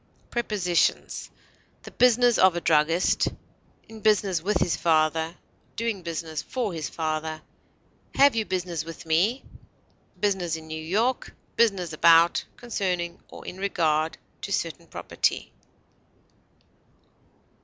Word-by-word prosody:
Prepositions: 205 Hz, -7 st, 0 dB, 0.5 s
The -, -, -10 dB
business 245 Hz, -1 st, +4 dB
of 185 Hz, -2 st, +5 dB
a -, -, 0 dB
druggist; 165 Hz, +2 st, +2 dB, 0.6 s
in 225 Hz, -1 st, -11 dB
business 200 Hz, -5 st, +2 dB
with 195 Hz, +2 st, +1 dB
his 175 Hz, -, +1 dB
father; 160 Hz, 0 st, +1 dB, 0.4 s
doing 230 Hz, -4 st, -2 dB
business 165 Hz, -2 st, -4 dB
for 235 Hz, -7 st, -3 dB
his 160 Hz, -3 st, -4 dB
father; 155 Hz, -1 st, -3 dB, 0.7 s
have 280 Hz, -2 st, +5 dB
you 225 Hz, -, +1 dB
business 180 Hz, -5 st, -3 dB
with 165 Hz, +1 st, -10 dB
me? 185 Hz, +11 st, +1 dB, 0.8 s
business 190 Hz, -5 st, 0 dB
in 160 Hz, -1 st, -9 dB
New 160 Hz, 0 st, -6 dB
York; 220 Hz, +10 st, -1 dB, 0.2 s
business 195 Hz, -8 st, +2 dB
about, 165 Hz, +2 st, +5 dB
concerning, 180 Hz, -7 st, -3 dB
or -, -, -12 dB
in 185 Hz, -, -8 dB
regard 160 Hz, -5 st, 0 dB, 0.2 s
to -, -, -6 dB
certain -, -, -3 dB
property. -, -, -2 dB
175 Hz, 115 wpm, -26 LUFS, 160-210 Hz, 0.8 s, of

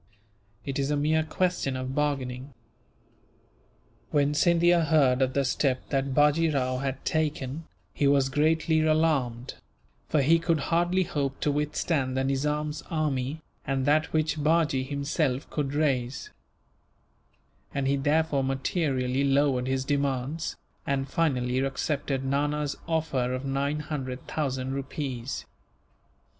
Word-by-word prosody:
It 135 Hz, 0 st, -3 dB
is 140 Hz, 0 st, 0 dB
a 150 Hz, -, +1 dB
mere 155 Hz, +2 st, +2 dB
question 160 Hz, -4 st, -1 dB
of 130 Hz, 0 st, -4 dB
bargaining." 135 Hz, -2 st, -2 dB, 1.5 s
When 145 Hz, 0 st, +2 dB
Scindia 170 Hz, +1 st, +4 dB
heard 140 Hz, -5 st, +3 dB
of 130 Hz, 0 st, +2 dB
the 140 Hz, 0 st, +1 dB
step 130 Hz, 0 st, 0 dB
that 135 Hz, -1 st, 0 dB
Bajee 150 Hz, +3 st, +4 dB
Rao 130 Hz, -3 st, 0 dB
had 135 Hz, 0 st, -4 dB
taken, 155 Hz, -1 st, -1 dB, 0.3 s
he 140 Hz, -, +1 dB
was 140 Hz, -1 st, +4 dB
greatly 155 Hz, +3 st, +2 dB
alarmed; 150 Hz, -6 st, +1 dB, 0.6 s
for 150 Hz, -3 st, +3 dB
he 165 Hz, +4 st, +5 dB
could 165 Hz, -1 st, +1 dB
hardly 175 Hz, +2 st, +2 dB
hope 140 Hz, -5 st, -2 dB
to 150 Hz, -, +2 dB
withstand 145 Hz, -2 st, -1 dB
the 130 Hz, -, +1 dB
Nizam's 150 Hz, +3 st, -1 dB
army, 150 Hz, -1 st, -1 dB, 0.2 s
and 135 Hz, -1 st, -1 dB
that 155 Hz, +3 st, +2 dB
which 155 Hz, -1 st, 0 dB
Bajee 155 Hz, -4 st, +2 dB
himself 140 Hz, -1 st, -1 dB
could 145 Hz, -2 st, -2 dB
raise; 135 Hz, -4 st, -1 dB, 1.4 s
and 140 Hz, -1 st, -1 dB
he 140 Hz, -, +3 dB
therefore 145 Hz, 0 st, +1 dB
materially 135 Hz, -1 st, 0 dB
lowered 135 Hz, -2 st, +2 dB
his 130 Hz, 0 st, -1 dB
demands, 140 Hz, +2 st, -1 dB, 0.3 s
and 135 Hz, -1 st, -1 dB
finally 130 Hz, -6 st, +1 dB
accepted 135 Hz, 0 st, -1 dB
Nana's 145 Hz, +1 st, 0 dB
offer 150 Hz, -6 st, 0 dB
of 130 Hz, +2 st, -5 dB
nine 140 Hz, +2 st, -1 dB
hundred 135 Hz, -4 st, -5 dB
thousand 130 Hz, -3 st, -2 dB
rupees. 135 Hz, -2 st, -4 dB
140 Hz, 125 wpm, -27 LUFS, 135-155 Hz, 1.5 s, he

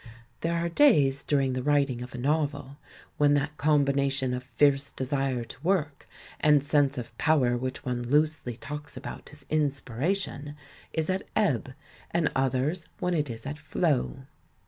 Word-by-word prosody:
There 170 Hz, +1 st, -1 dB
are 170 Hz, 0 st, 0 dB
days 150 Hz, -, +4 dB
during 135 Hz, -3 st, +1 dB
the 130 Hz, -, -1 dB
xii -, -, -2 dB
INTRODUCTION 145 Hz, +3 st, +1 dB, 0.2 s
writing 120 Hz, -, -8 dB
of 125 Hz, +1 st, -7 dB
a -, -, -5 dB
novel 145 Hz, 0 st, -1 dB, 0.4 s
when 145 Hz, 0 st, +5 dB
that 145 Hz, +1 st, -1 dB
combination 140 Hz, -3 st, +2 dB
of 125 Hz, 0 st, -4 dB
fierce 140 Hz, -1 st, +3 dB
desire 130 Hz, -2 st, -1 dB
to 115 Hz, -, -12 dB
work 160 Hz, -6 st, 0 dB, 0.3 s
and 150 Hz, -2 st, +4 dB
sense 145 Hz, -2 st, +2 dB
of 120 Hz, -2 st, -6 dB
power 135 Hz, -6 st, +3 dB
which 130 Hz, +1 st, -4 dB
one 125 Hz, -1 st, -1 dB
loosely 150 Hz, -4 st, +1 dB
talks 150 Hz, +2 st, -7 dB
about -, -, -8 dB
as 145 Hz, -2 st, -11 dB
"inspiration," 145 Hz, -, -1 dB, 0.4 s
is 160 Hz, -1 st, -1 dB
at 190 Hz, -, -3 dB
ebb, 140 Hz, -, +1 dB, 0.4 s
and 170 Hz, -2 st, +1 dB
others 135 Hz, +6 st, 0 dB
when 180 Hz, 0 st, -1 dB
it 150 Hz, -4 st, 0 dB
is 115 Hz, 0 st, -7 dB
at 145 Hz, +2 st, -5 dB
flow. 145 Hz, -3 st, 0 dB
145 Hz, 165 wpm, -28 LUFS, 130-155 Hz, 0.4 s, when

